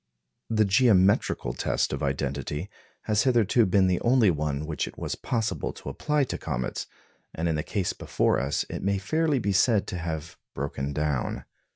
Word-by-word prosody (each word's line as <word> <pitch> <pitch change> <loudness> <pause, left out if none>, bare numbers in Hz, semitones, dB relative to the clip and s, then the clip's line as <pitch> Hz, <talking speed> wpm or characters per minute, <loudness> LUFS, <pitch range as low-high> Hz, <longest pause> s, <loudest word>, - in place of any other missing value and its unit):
The 110 -1 +3
geometrical 100 - +3
test - - 0
of 70 - -3
identity 70 - -2 0.3
has 105 -1 +2
hitherto 120 -3 +3
been 95 +1 +4
the 90 -1 +1
only 120 -5 +4
one 75 -1 -2
which 75 -3 -2
it - - -10
was - - -3
possible 115 -3 -2
to - - -8
apply 150 -1 0
to 130 - -4
comets, 65 0 -3 0.5
and 80 +1 -1
in 80 - +1
the 75 - -1
case 95 +3 -2
before - - +1
us 70 +2 -1
it - - -5
may 100 +1 +1
fairly 155 - +1
be 100 -5 0
said 105 +2 +3
to 90 - -4
have 80 -1 -5 0.2
broken 70 0 -3
down. 75 -3 -2
90 Hz, 175 wpm, -27 LUFS, 75-110 Hz, 0.5 s, been